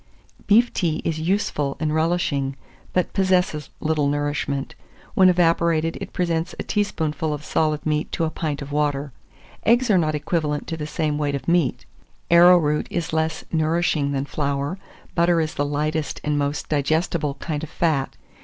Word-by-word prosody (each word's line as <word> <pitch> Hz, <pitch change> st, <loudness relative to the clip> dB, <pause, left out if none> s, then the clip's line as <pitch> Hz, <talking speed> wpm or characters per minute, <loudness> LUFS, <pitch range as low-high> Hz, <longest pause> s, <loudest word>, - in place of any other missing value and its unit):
Beef 235 Hz, +4 st, +5 dB
tea 160 Hz, -4 st, 0 dB
is 160 Hz, -1 st, -1 dB
useful 160 Hz, -5 st, -1 dB
and 155 Hz, -1 st, 0 dB
relishing, 155 Hz, -4 st, 0 dB, 0.4 s
but 180 Hz, -, 0 dB
possesses 180 Hz, -6 st, +1 dB
little 155 Hz, -2 st, +1 dB
nourishment; 145 Hz, -1 st, -2 dB, 0.4 s
when 185 Hz, -1 st, +6 dB
evaporated, 170 Hz, -2 st, +2 dB
it -, -, -6 dB
presents 170 Hz, -1 st, -1 dB
a -, -, -3 dB
teaspoonful 160 Hz, -7 st, -1 dB
of 150 Hz, 0 st, -10 dB
solid 155 Hz, -1 st, 0 dB
meat 150 Hz, 0 st, -1 dB
to -, -, 0 dB
a 160 Hz, -, 0 dB
pint 150 Hz, -4 st, -3 dB
of 140 Hz, -, -9 dB
water. 145 Hz, -1 st, 0 dB, 0.5 s
Eggs 240 Hz, +1 st, +3 dB
are 190 Hz, -, +5 dB
not 155 Hz, -2 st, 0 dB
equivalent 150 Hz, -1 st, -1 dB
to 165 Hz, -, -4 dB
the 150 Hz, -2 st, -5 dB
same 150 Hz, -1 st, -1 dB
weight 145 Hz, -1 st, 0 dB
of 135 Hz, -2 st, -6 dB
meat. 170 Hz, -6 st, +1 dB, 0.5 s
Arrowroot 170 Hz, -3 st, +5 dB
is 170 Hz, -2 st, -3 dB
less 160 Hz, 0 st, -1 dB
nourishing 160 Hz, -2 st, +1 dB
than 135 Hz, 0 st, -1 dB
flour. 145 Hz, +4 st, -2 dB, 0.3 s
Butter 170 Hz, -1 st, +3 dB
is 160 Hz, -1 st, -1 dB
the 145 Hz, -, -1 dB
lightest 150 Hz, +1 st, -2 dB
and 150 Hz, 0 st, 0 dB
most 145 Hz, 0 st, -1 dB
digestible 150 Hz, 0 st, 0 dB
kind 150 Hz, 0 st, -4 dB
of 160 Hz, -, -6 dB
fat. 155 Hz, -6 st, 0 dB
155 Hz, 165 wpm, -23 LUFS, 145-170 Hz, 0.5 s, when